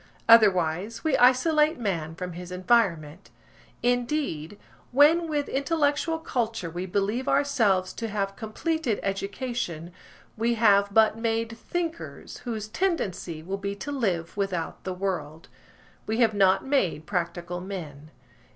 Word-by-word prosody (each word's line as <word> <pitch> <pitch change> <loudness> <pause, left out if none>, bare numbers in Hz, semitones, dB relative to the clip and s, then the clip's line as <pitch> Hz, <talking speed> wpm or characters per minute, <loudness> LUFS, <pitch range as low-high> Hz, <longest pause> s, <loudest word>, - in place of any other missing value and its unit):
Otherwise, 200 -2 +4
we 315 -4 +2
isolate 300 +5 +4
man 170 -9 -3
from 180 0 -5
his 180 +1 -8
environment. 180 -4 +1 0.5
Indeed, 245 - -1 0.3
when 305 +6 +5
with 295 -2 -1
intellectual 295 +2 0
culture 225 - -3
we 180 +3 -4
believe 205 +7 -1
ourselves 215 -10 +2
to 230 - -4
have 200 -2 -2
completed 245 +3 -2
education, 195 - -3 0.4
we 235 +2 +1
have 200 -3 +4
but 220 +1 +4
made 230 0 -1
thinkers, 335 +8 -5
whose 220 -3 -5
tendency 215 - -2
will 190 +4 -4
be 200 0 -3
to 200 +9 -6
live 185 -11 -1
without 190 -5 -3
the 185 - -2
world. 170 -5 -4 0.6
We 220 +1 -1
have 225 -2 +4
not 195 -2 +3
made 190 - 0
practical 175 -1 -3
men. 155 -6 -7
205 Hz, 125 wpm, -26 LUFS, 180-245 Hz, 0.6 s, when